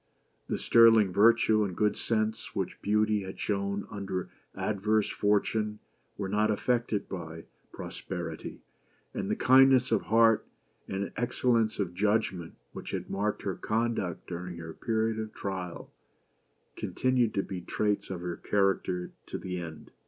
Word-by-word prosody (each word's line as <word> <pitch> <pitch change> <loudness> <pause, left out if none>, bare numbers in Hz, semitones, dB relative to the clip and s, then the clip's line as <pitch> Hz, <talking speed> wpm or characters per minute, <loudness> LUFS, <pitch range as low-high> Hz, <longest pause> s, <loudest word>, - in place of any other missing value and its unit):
The - - -1
sterling 115 -4 +6
virtue 110 +1 +5
and 95 -4 -4
good 105 -1 +2
sense 110 -1 -1
which - - -3
Beauty 105 0 +2
had 95 0 -8
shown 100 0 -1
under 95 -3 -4 0.2
adverse 105 +1 +1
fortune 105 +1 +1 0.4
were 100 - -3
not 105 +2 +1
affected 115 0 0
by 80 -3 -7 0.3
pros - - -8
perity; 85 -4 -6 0.5
and - - -3
the - - +1
kindness 130 -1 +5
of 110 - +3
heart, 115 0 +4 0.4
and 95 +1 -3
excellence 115 -2 +1
of 95 -4 -2
judgment, 100 -3 0 0.2
which - - -7
had - - -4
marked 105 +2 -1
her 95 - -1
conduct 110 -4 -2
during 90 0 -6
her 80 -1 -7
period 110 +1 -1
of 110 -1 -6
trial, 95 -3 -5 0.8
continued 125 -3 0
to 100 - +1
be 95 -2 -6
traits 105 +3 -1
of 95 -3 -5
her 90 -1 -4
character 95 -3 0 0.2
to - - -4
the 90 -1 -4
end. 80 -3 -8
105 Hz, 145 wpm, -29 LUFS, 95-110 Hz, 0.8 s, sterling